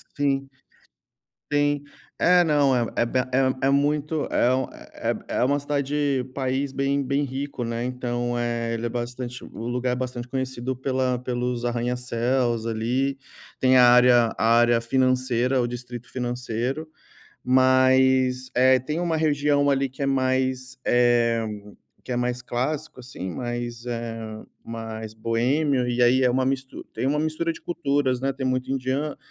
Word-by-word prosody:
Sim. 135 -1 0 1.0
Sim, 145 0 +2 0.3
é, 180 0 +5
não 145 -4 +3
é 120 -2 +1
é 120 - +2
bem, 130 +2 +1 0.4
é 135 - +2
é - - +3
muito, 145 +2 +1
é 125 +1 +3
um 130 - 0
é - - -5 0.2
é - - -3
é - - +3
uma 140 +3 +2
cidade 140 -2 -1
país 135 +1 -1
bem 140 +1 0
bem 140 +2 0
rico, 135 -1 -4
né, 115 0 -3
então 120 -1 -2
eh, 120 -1 -1
ele 115 +1 -2
é - - -4
bastante. 125 +1 -5
O 115 +2 -7
lugar 125 +1 -1
é 125 - 0
bastante 125 -1 -4
conhecido 130 0 -3
pela 130 -1 -1
pelos 125 -1 -2
arranha-céus, 120 0 -1
ali. 125 +5 0 0.4
Tem 130 0 +5
a 125 - +7
área 120 -1 +5
a - - 0
área 120 -1 +4
financeira, 130 0 +1
o 120 - 0
distrito 120 0 -8
financeiro. 125 +4 -3 0.6
Mas 130 0 +4
é, 130 +1 +5
tem 150 +6 -3
uma 170 -2 0
região 145 -2 +2
ali 135 0 +1
que 130 +2 -8
é - - +1
mais 130 0 0
eh 120 -1 +3 0.6
que 125 - -4
é - - -1
mais 125 0 -1
clássico 130 +4 -3
assim, 120 -7 -7
mais 120 +1 -5
eh, 115 -2 -5 0.2
mais 110 -1 -6
boêmio. 125 +4 +1
E 120 0 -1
aí 125 +2 +4
é 125 - +4
uma 130 +1 +1
mistu 130 0 -3
tem - - -2
uma 145 +2 +1
mistura 155 +2 -1
de - - -12
culturas, 140 -6 0
né? 135 0 0
Tem 130 -1 -4
muito 130 0 -1
indiano, 135 +3 -2
130 Hz, 160 wpm, -24 LUFS, 120-135 Hz, 1.0 s, a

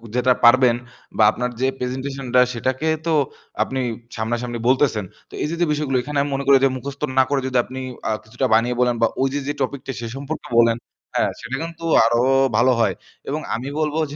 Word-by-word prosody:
যেটা 125 +1 +3
পারবেন 120 0 +6 0.4
বা 110 - +5
আপনার 125 0 -2
যে 130 - +3
presentation 130 +2 -4
টা 125 - +8
সেটাকে 130 +6 -2 0.2
তো 165 - +2 0.5
আপনি 130 0 -4 0.4
সামনাসামনি 120 +1 -2
বলতেছেন। 130 -6 +2 0.2
তো - - -19
এই - - 0
যে - - -2
যে - - +5
বিষয়গুলো 145 -3 0
এখানে 145 +1 -4
আমি 145 - -2
মনে 140 - -2
করি 140 -1 +7
যে - - +4
মুখস্থ 140 +2 -8 0.2
না - - +7
করে 140 -1 +1
যদি 130 -1 0
আপনি 130 +1 -7 0.3
আ - - +1
কিছুটা 120 +4 -3
বানিয়ে 120 +2 +2
বলেন 125 -1 +3
বা 115 - +5
ওই 135 - +3
যে 145 - 0
যে 145 - 0
topic 130 0 -2
টা, - - -1
সে 115 - -4
সম্পর্কে 140 +2 -6
বলেন 115 0 +4 0.4
হ্যাঁ - - +2
সেটা 120 +3 -4
কিন্তু 165 0 -7 0.2
আরো 120 +1 +2 0.4
ভালো 130 +2 +4
হয়। - - +2 0.3
এবং 155 +2 -2
আমি 125 +4 -5
বলবো 155 +1 0
যে - - -7
130 Hz, 210 wpm, -21 LUFS, 120-140 Hz, 0.5 s, টা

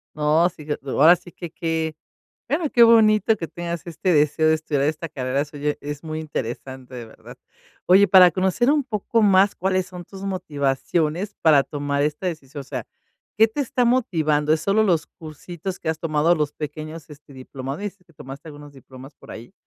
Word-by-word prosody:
No, 155 +3 +3
sí, 150 - -14
que 150 - -2
ahora 150 +5 +5
sí 175 0 -15
qué 175 -2 -8
qué, 160 -2 -3 0.5
bueno, 300 +2 -1
qué 240 - +5
bonito 220 -1 +5
que 170 -5 -5
tengas 170 0 -6
este 175 +2 -2
deseo 150 +2 +3
de 160 - +4
estudiar 150 -3 -2
esta 155 +1 -2
carrera 135 0 -2
suya, 145 0 -3
es 145 +1 -6
muy 155 -1 -5
interesante, 130 -3 -6
de 120 -2 -7
verdad. 110 - -14 0.5
Oye, 195 +3 +5
para 180 -1 +8
conocer 190 - +1
un 295 -3 +2
poco 225 -1 -1
más 200 -1 +4
cuáles 185 0 0
son 180 -1 -9
tus 195 +2 -12
motivaciones 165 +1 -2
para 150 -4 +5
tomar 145 0 -2
esta 150 +5 -2
decisión, 145 -4 -6
o - - -15
sea, - - -6 0.5
¿qué 220 +2 +5
te 285 +6 -4
está 250 -2 0
motivando? 155 -11 +1
Es 155 - -4
solo 200 +4 +2
los 170 -7 +1
cursitos 175 +3 -8
que 160 - -2
has 160 - -4
tomado, 165 +1 +2
los 150 -2 -2
pequeños, 155 +1 -7
este, 145 -1 -15
diplomades, 140 +10 -7
y 180 - -28
que 165 - -25
tomaste 140 +3 -10
algunos 145 -1 -12
diplomas 135 0 -14
por - - -16
ahí. 115 +2 -10
160 Hz, 190 wpm, -22 LUFS, 145-185 Hz, 0.5 s, para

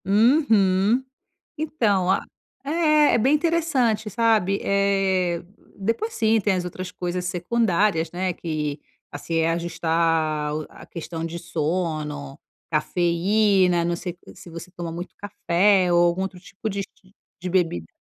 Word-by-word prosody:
Uhum. 215 -1 +3 0.6
Então 215 - +1
a - - +1 0.4
é. 305 +1 +2 0.2
É - - +4
bem 260 +6 +3
interessante, 290 -10 +1
sabe. 215 -3 +2
Eh, 195 -3 +1 0.4
depois, 230 - -1
sim, 225 -1 +2
tem 205 -1 +1
as 180 -1 -2
outras 180 +1 -6
coisas 180 0 -4
secundárias, 180 -2 +1
né, 180 +1 -2
que, 155 -3 -4 0.3
assim, 155 +3 -4
é 165 0 +2
ajustar 165 -2 0
o 155 0 -4
a - - -14
questão 165 -1 -6
de 165 +1 -5
sono, 155 -4 -3 0.3
cafeína 175 +3 +2
não 175 0 0
sei 175 +1 -6
s - - -12
se 175 - -12
você 170 +2 -9
toma 170 -2 -6
muito 175 +3 -7
café 190 -1 +2
ou 175 0 +5
algum 175 +2 0
outro 190 -2 -5
tipo 195 +4 -6
de 200 -1 -2 0.6
de 180 - -4
bebida. 165 - 0
180 Hz, 140 wpm, -23 LUFS, 170-210 Hz, 0.6 s, ou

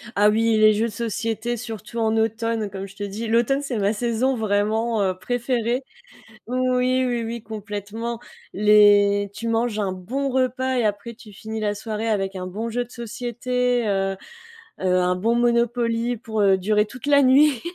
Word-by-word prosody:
Ah 205 +1 +5
oui, 225 +1 +2
les 215 0 +6
jeux 220 +2 0
de - - -6
société, 225 +1 -3
surtout 230 0 -7
en 220 0 +1
automne, 225 -1 -1
comme 195 0 -6
je 195 - -16
te 205 - -5
dis, 205 +3 -4
l'automne, 235 +5 +2
c'est 275 -4 -3
ma 205 0 +1
saison 240 +4 0
vraiment, 220 +1 0
heu, 185 -2 0
préférée. 245 +4 -1 0.6
Oui, 255 +1 +1
oui, 240 -2 -1
oui 230 +1 -5
complètement. 215 +2 -6 0.3
Les 205 -1 +5
tu 230 +3 -5
manges 230 -1 0
un 195 -3 -1
bon 255 +10 -3
repas 260 0 0
et 245 - +1
après 210 +2 -2
tu 220 -2 -15
finis 220 +2 -6
la 205 -1 0
soirée, 220 +2 -4
avec 195 -2 -1
un 185 -1 -5
bon 215 +5 -4
jeu 245 +2 -1
de 240 - -18
société, 245 +1 -2
heu, 195 -1 0 0.6
heu, 185 -1 +2
un 180 0 +2
bon 225 +6 +1
Monopoly 235 0 +1
pour, 220 -1 -4
heu, 195 -2 +4
durer 210 +3 +2
toute 255 +4 -10
la 285 -1 +5
nuit. 270 0 +5
225 Hz, 180 wpm, -23 LUFS, 205-240 Hz, 0.6 s, les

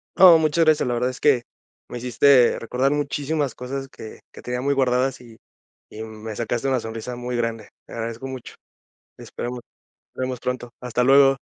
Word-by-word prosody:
No, 180 -3 +9
muchas 160 +1 +2
gracias. 155 -4 +3
La 120 - 0
verdad 125 +2 0
es 125 - -11
que 135 -5 +3 0.5
me 120 - -6
hiciste 125 +1 +4
recordar 125 +4 0
muchísimas 145 0 -1
cosas 135 +2 -5
que 110 -4 -11
que - - -12
tenía 125 0 -3
muy 140 +1 +1
guardadas, 130 -1 +1
y 115 -2 -15 0.5
y 110 - -8
me 110 -1 -8
sacaste 120 +2 -2
una 130 -1 +1
sonrisa 115 +2 -6
muy 125 0 -4
grande. 115 -3 -3 0.2
Te - - -13
agradezco 115 +2 -5
mucho. 130 -2 -8 0.6
Esperamos 125 +1 -6 0.6
nos - - -5
vemos 130 -1 -3
pronto. 125 -1 -4
Hasta 125 0 -1
luego. 135 +1 +6
125 Hz, 175 wpm, -23 LUFS, 120-135 Hz, 0.6 s, No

